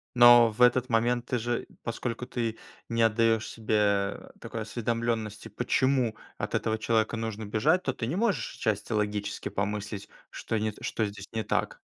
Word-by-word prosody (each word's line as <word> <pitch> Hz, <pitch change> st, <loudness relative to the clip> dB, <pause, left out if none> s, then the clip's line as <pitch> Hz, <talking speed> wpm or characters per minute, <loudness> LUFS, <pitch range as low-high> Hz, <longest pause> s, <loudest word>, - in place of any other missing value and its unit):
Но 120 Hz, -1 st, +8 dB
в 105 Hz, -, -6 dB
этот 125 Hz, +1 st, +5 dB
момент, 120 Hz, +1 st, +2 dB
ты 125 Hz, -, 0 dB
же, 120 Hz, +1 st, -2 dB, 0.2 s
поскольку 115 Hz, +1 st, -3 dB
ты 115 Hz, -3 st, -3 dB, 0.3 s
не 115 Hz, 0 st, 0 dB
отдаешь 115 Hz, 0 st, +3 dB
себе 105 Hz, -3 st, +1 dB, 0.2 s
такой 115 Hz, -, -6 dB
осведомленности, 110 Hz, -1 st, -2 dB
почему 125 Hz, +1 st, +1 dB, 0.2 s
от -, -, -3 dB
этого 110 Hz, 0 st, 0 dB
человека 110 Hz, 0 st, +1 dB
нужно 110 Hz, -1 st, -4 dB
бежать, 130 Hz, -, +2 dB
то 130 Hz, -, -1 dB
ты 115 Hz, -, -4 dB
не 140 Hz, -, -2 dB
можешь 210 Hz, 0 st, 0 dB
отчасти 110 Hz, -1 st, -1 dB
логически 105 Hz, -1 st, -2 dB
помыслить, 100 Hz, 0 st, -3 dB, 0.2 s
что 115 Hz, -, -3 dB
не 110 Hz, 0 st, -1 dB
что 110 Hz, -, -1 dB
здесь 100 Hz, -1 st, -7 dB
не 110 Hz, -1 st, -1 dB
так. -, -, -1 dB
115 Hz, 160 wpm, -28 LUFS, 105-120 Hz, 0.3 s, Но